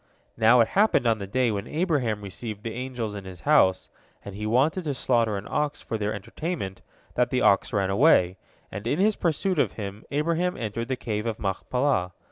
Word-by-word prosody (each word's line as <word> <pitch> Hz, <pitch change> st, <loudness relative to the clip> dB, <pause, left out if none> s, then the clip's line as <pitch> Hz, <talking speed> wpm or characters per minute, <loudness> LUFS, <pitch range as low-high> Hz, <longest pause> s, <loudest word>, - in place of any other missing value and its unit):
Now, 115 Hz, +2 st, +5 dB
it 115 Hz, -, +2 dB
happened 200 Hz, -, +3 dB
on 115 Hz, -2 st, +2 dB
the 100 Hz, -, -5 dB
day 125 Hz, +3 st, +1 dB
when 100 Hz, +1 st, -3 dB
Abraham 140 Hz, -, 0 dB
received 105 Hz, +2 st, -6 dB
the 115 Hz, -2 st, -4 dB
angels 125 Hz, -4 st, -4 dB
in 100 Hz, -1 st, -7 dB
his 95 Hz, -1 st, -10 dB
house, 115 Hz, -12 st, +3 dB, 0.4 s
and 100 Hz, -, -7 dB
he 105 Hz, +2 st, -4 dB
wanted 145 Hz, -, +2 dB
to 145 Hz, -3 st, -1 dB
slaughter 115 Hz, -5 st, +1 dB
an 100 Hz, -, -7 dB
ox 150 Hz, -1 st, -1 dB
for -, -, -5 dB
their 105 Hz, -1 st, -1 dB
entertainment, 105 Hz, -, -5 dB, 0.3 s
that 125 Hz, 0 st, +1 dB
the 125 Hz, -, 0 dB
ox 100 Hz, -, +3 dB
ran 100 Hz, -3 st, 0 dB
away, 95 Hz, -, +4 dB, 0.3 s
and 105 Hz, +3 st, -6 dB
in 145 Hz, -, +1 dB
his 210 Hz, +3 st, +3 dB
pursuit 175 Hz, +1 st, 0 dB
of -, -, +2 dB
him 100 Hz, -1 st, -7 dB
Abraham 170 Hz, +5 st, 0 dB
entered 115 Hz, +1 st, -4 dB
the 130 Hz, -, -1 dB
Cave 110 Hz, -3 st, -3 dB
of 115 Hz, -, -2 dB
Machpelah. 100 Hz, 0 st, -1 dB
115 Hz, 200 wpm, -26 LUFS, 105-145 Hz, 0.4 s, Now